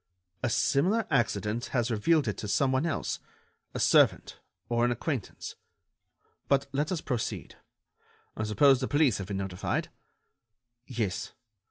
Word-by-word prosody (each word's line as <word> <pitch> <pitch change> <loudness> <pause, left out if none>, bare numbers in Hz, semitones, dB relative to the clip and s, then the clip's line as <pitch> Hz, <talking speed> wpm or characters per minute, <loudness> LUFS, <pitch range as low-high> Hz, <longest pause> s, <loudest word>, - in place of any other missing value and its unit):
"A - - 0
similar 145 - +2
accident 115 -3 0
has 120 0 +1
revealed 140 +6 +2
it 105 - -1
to 105 - -5
some 130 +6 +2
one 130 +5 +1
else... 155 - -2 0.6
a - - -2
servant... - - +3 0.3
or 120 0 +1
an 120 - +3
acquaintance. 120 - -4 0.9
But 140 -1 +3
let 145 +4 -1
us 175 -4 -1
proceed: 125 -5 -3 0.8
I - - -4
suppose 130 +6 +5
the 130 - -2
police 145 -9 +3
have 95 - -5
been 100 -1 -3
notified?" 95 -2 -2 1.0
"Yes. 110 -7 -3
120 Hz, 140 wpm, -29 LUFS, 105-140 Hz, 1.0 s, suppose